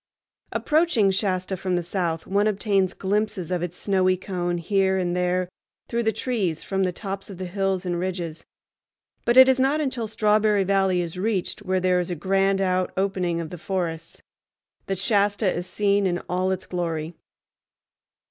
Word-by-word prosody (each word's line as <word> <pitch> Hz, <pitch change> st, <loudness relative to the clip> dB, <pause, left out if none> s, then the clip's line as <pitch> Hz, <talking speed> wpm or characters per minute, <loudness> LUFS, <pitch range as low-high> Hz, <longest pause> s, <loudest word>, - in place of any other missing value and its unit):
Approaching 305 Hz, -, +2 dB
Shasta 190 Hz, -1 st, -1 dB
from 185 Hz, 0 st, -2 dB
the 175 Hz, -, 0 dB
south, 170 Hz, -2 st, -2 dB
one 200 Hz, +2 st, +2 dB
obtains 195 Hz, -3 st, +1 dB
glimpses 200 Hz, -2 st, -1 dB
of 180 Hz, -2 st, 0 dB
its 175 Hz, 0 st, -4 dB
snowy 185 Hz, -2 st, +2 dB
cone 175 Hz, -2 st, -2 dB
here 190 Hz, +2 st, +1 dB
and 175 Hz, -1 st, -1 dB
there 180 Hz, 0 st, 0 dB, 0.4 s
through 235 Hz, 0 st, -1 dB
the 220 Hz, -1 st, +2 dB
trees 210 Hz, -8 st, -2 dB
from 195 Hz, -1 st, -1 dB
the 185 Hz, -1 st, +1 dB
tops 195 Hz, +2 st, -6 dB
of 195 Hz, -, -8 dB
hills 190 Hz, 0 st, -1 dB
and 175 Hz, -1 st, -1 dB
ridges; 175 Hz, -3 st, -4 dB, 0.8 s
but 240 Hz, +1 st, +3 dB
it 260 Hz, 0 st, +10 dB
is 265 Hz, 0 st, +3 dB
not 275 Hz, +4 st, +2 dB
until 260 Hz, -6 st, -2 dB
Strawberry 210 Hz, -1 st, +2 dB
Valley 190 Hz, -2 st, +2 dB
is 175 Hz, +1 st, -5 dB
reached, 200 Hz, -2 st, -1 dB
where 185 Hz, -2 st, 0 dB
there 180 Hz, 0 st, +2 dB
is 180 Hz, -, -2 dB
a 175 Hz, -, -2 dB
grand 195 Hz, +3 st, +1 dB
out 185 Hz, -1 st, +1 dB
opening 185 Hz, -3 st, 0 dB
of 165 Hz, -2 st, -5 dB
the 180 Hz, -, -7 dB
forests, 165 Hz, -3 st, -4 dB, 0.7 s
that 195 Hz, -, -1 dB
Shasta 205 Hz, -1 st, +2 dB
is 175 Hz, -, -4 dB
seen 200 Hz, +1 st, +2 dB
in 175 Hz, -1 st, 0 dB
all 185 Hz, +1 st, 0 dB
its 190 Hz, 0 st, -2 dB
glory. 165 Hz, -2 st, -3 dB
190 Hz, 170 wpm, -24 LUFS, 180-205 Hz, 0.8 s, it